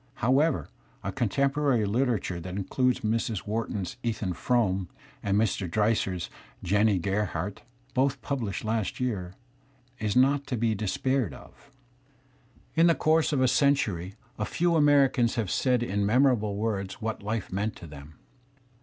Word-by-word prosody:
However, 135 +6 +2 0.4
a 95 - -2
contemporary 135 +1 +1
liter 120 +3 +1
ature 90 -3 -5
that 90 +2 -6
includes 125 +6 0
Mrs. 110 -2 -1
Wharton's 105 -1 -3
" - - -36
Ethan 110 -6 -2
Frome* 95 -5 0
^ - - -33 0.3
and 100 0 +1
j - - +4
n 115 - +4
Mr. 95 -2 -3
Dreiser's 100 -2 0 0.4
"Jennie 105 +2 +3
Gerha 100 +1 -1
rdt'* - - -19 0.4
both 135 +1 +1
published 115 -8 -3
last 110 -3 -1
year, 95 -8 -3 0.3
* 130 -1 -28
^ - - -5
is 105 -2 0
not 140 +2 +3
to 125 -4 -2
be 115 0 +1
despaired 110 +3 -1
of. - - -16 1.0
In 165 +1 +5
the 165 - +4
course 160 +1 +2
of 140 -3 +1
a 130 - +4
century 110 - +1 0.2
a 105 - 0
few 170 +6 +1
Americans 140 -5 +4
have 110 -5 -1
said 125 -2 +2
in 100 -3 -1
memorable 110 -2 +3
words 100 -2 -2
what 110 -1 -3
life 105 -1 -3
meant 105 +2 -1
to - - -11
them. 75 0 -12
110 Hz, 165 wpm, -27 LUFS, 100-130 Hz, 1.0 s, In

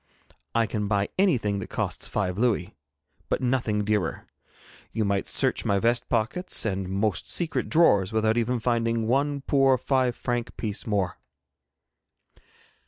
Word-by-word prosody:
I 115 -1 +3
can 105 -1 -2
buy 100 -1 0
anything 120 - +2
that - - -6
costs - - -2
five 90 -3 -1
louis, 110 -5 0 0.6
but - - +1
nothing 120 -5 0
dearer. 100 -7 -1 0.7
You 110 - -1
might 100 -1 0
search - - +1
my 100 - +1
vest 120 +4 +1
pockets 120 - -1
and 95 -3 -2
most 100 +1 -1
secret 170 -2 -1
drawers 105 - +4
without 110 0 +2
even 120 +1 0
finding 115 -1 0
one 140 +4 +1
poor 135 -1 +3
five 130 -2 +1
franc 120 -1 -3
piece 110 0 -4
more.' 100 -5 0
115 Hz, 140 wpm, -26 LUFS, 100-125 Hz, 0.7 s, drawers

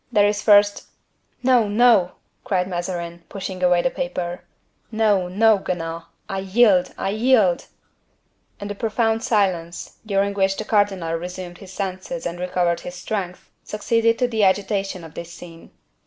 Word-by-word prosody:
There 210 -3 +4
is 205 0 -1
first—" 205 -1 +4 0.6
"No, 250 -4 +4
no!" 210 -4 +4 0.3
cried 185 -3 0
Mazarin, 175 -1 -4
pushing 190 -2 -6
away 180 -1 +3
the 260 - +1
paper. 180 -11 -4 0.5
"No, 210 -4 +2
no, 210 +3 +3
Guenaud, 165 -3 -4 0.2
I 195 -1 -3
yield! 195 -1 +3
I 195 - -2
yield!" 215 -5 +2 0.9
And 205 0 -5
a - - -2
profound 225 +1 0
silence, 180 -6 -1
during 200 -1 0
which 195 -1 +1
the 215 - -4
cardinal 200 -6 +1
resumed 175 +1 -6
his 195 -2 -12
senses 190 +6 -5
and 175 0 -4
recovered 180 -1 0
his 180 - -8
strength, 180 -1 -5
succeeded 230 +2 +1
to 250 - +1
the 225 -3 0
agitation 195 -1 0
of 160 -2 -11
this 170 0 -8
scene. 165 -1 -12
195 Hz, 150 wpm, -22 LUFS, 180-215 Hz, 0.9 s, There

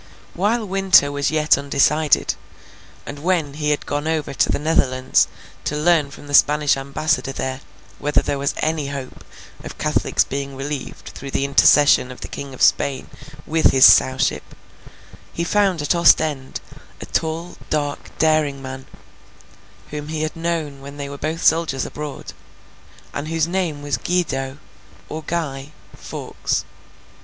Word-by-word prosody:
While 215 +5 0
Winter 190 -7 +4
was 145 0 0
yet 155 -2 +3
undecided, 140 +2 +2 0.7
and 145 - -7
when 165 -3 0
he 150 0 -2
had 150 - 0
gone 145 +2 -2
over 160 -3 -1
to - - +2
the - - +1
Netherlands, 130 -4 +2 0.4
to 150 - -1
learn 155 -2 +3
from 140 - -12
the 145 - -8
Spanish 150 +1 +4
Ambassador 135 -1 -1
there 130 0 -4 0.4
whether 145 0 +1
there 140 - -2
was 140 - -1
any 155 -2 -1
hope 140 -2 -7 0.4
of - - -8
Catholics - - +1
being 140 0 -5
relieved 140 0 -6
through 140 - -9
the 135 - -1
intercession 140 -1 +5
of 125 - -12
the - - -5
King 140 -2 -7
of - - -2
Spain 135 -2 +2 0.3
with 160 +1 +3
his 130 -1 +6
Sowship, 130 +1 +5 0.9
he 170 - -2
found 190 -3 +1
at 145 - +2
Ostend 155 -5 +2 0.4
a - - -7
tall, 165 +2 -3
dark, 145 -2 -2
daring 155 -3 +2
man, 130 0 -8 1.0
whom 150 0 -5
he 155 0 -3
had 155 - -3
known 165 -4 -3
when 140 +1 -10
they 140 -1 -5
were 140 - -7
both 160 +2 -3
soldiers 160 -5 +2
abroad, 150 -2 -7 0.8
and 145 +2 -4
whose 165 -1 0
name 170 -5 -2
was 145 -1 -1
Guido—or 150 -1 -4
Guy—Fawkes. 150 -4 -4
145 Hz, 145 wpm, -21 LUFS, 140-160 Hz, 1.0 s, his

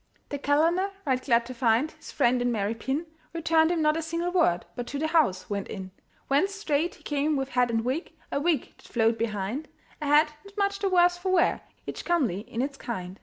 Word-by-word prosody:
The 285 - -4
calender, 330 +7 +2 0.2
right 255 -2 +1
glad 235 -3 +3
to 255 - -7
find 240 +4 +2
His 310 - -12
friend 250 -3 +2
in 245 0 +1
merry 210 -1 0
pin, 265 +8 -2 0.3
Returned 325 -1 +3
him 335 -3 +1
not 305 0 +3
a 325 - -1
single 335 +2 -2
word, 320 - +2
But 245 -1 -4
to 285 - -4
the 305 - -1
house 295 - +2
went 200 -1 -3
in; 190 -2 -7 0.4
Whence 370 +9 +2
straight 335 -4 0
he - - -21
came 295 +1 0
with 270 -1 -2
hat 250 -1 +2
and 225 0 0
wig, 270 +8 -2 0.2
A - - 0
wig 315 -4 0
that - - -20
flowed 225 -1 +1
behind, 220 +6 -2 0.3
A 295 - -2
hat 300 +1 +5
not 400 +1 -16
much 400 0 +1
the 400 -1 +1
worse 355 -1 +4
for 375 +1 -1
wear, 360 -2 +3 0.2
Each - - -5
comely 275 - +1
in 240 0 -1
its 275 0 -4
kind. 190 -7 -6
285 Hz, 220 wpm, -27 LUFS, 235-330 Hz, 0.4 s, hat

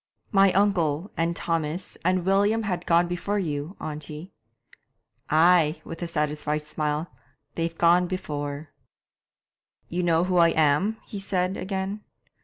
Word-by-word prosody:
"' - - -51
'My 195 -1 +5
uncle, 180 -4 +1
and 170 +1 0
Thomas, 165 +2 -3
and 185 0 +1
William 205 +4 +2
have 180 -4 -3
gone 170 +1 +4
before 175 +4 -2
you, 155 -1 -3
auntie.' 155 +3 -6 1.0
'Ay' 160 0 +4
with 165 +1 -8
a 175 - -2
satisfied 150 -1 -1
smile 150 +1 -2 0.5
'they've 165 0 -3
gone 175 +1 +4
before.' 145 -5 -5 1.2
'You 175 +2 -1
know 170 -1 +2
who 180 0 0
I 170 -1 +5
am?' 160 +8 +3
he 205 - -7
said 185 -1 -1
again. 190 +2 -3
170 Hz, 135 wpm, -25 LUFS, 155-190 Hz, 1.2 s, My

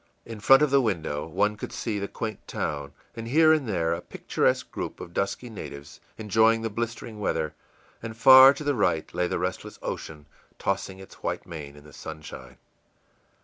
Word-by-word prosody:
In 115 -2 -8
front 135 +7 +6
of 150 - +2
the 140 -1 +5
window 80 - -2
one 105 +5 +1
could - - -7
see 110 -3 -3
the 100 - -3
quaint 110 -1 -6
town, 70 -1 -3 0.2
and 115 0 -6
here 155 +5 +5
and 145 -7 0
there 85 -4 0
a 85 - -4
picturesque - - -1
group - - -5
of 85 - -9
dusky 100 +6 -2
natives, 75 -10 -9 0.2
enjoying 110 +1 +3
the 115 - -2
blistering 115 0 -5
weather; 80 -6 -1 0.5
and 115 -1 -7
far 130 +3 +10
to 150 - -6
the 145 0 +1
right 90 - 0
lay 90 0 0
the - - -2
restless - - -4
ocean, 75 -2 -6 0.3
tossing 95 0 -2
its 95 0 -14
white - - -3
mane 75 -4 -8
in 75 - -15
the 75 -1 -16
sunshine. 75 -1 -9
105 Hz, 185 wpm, -26 LUFS, 80-115 Hz, 0.5 s, far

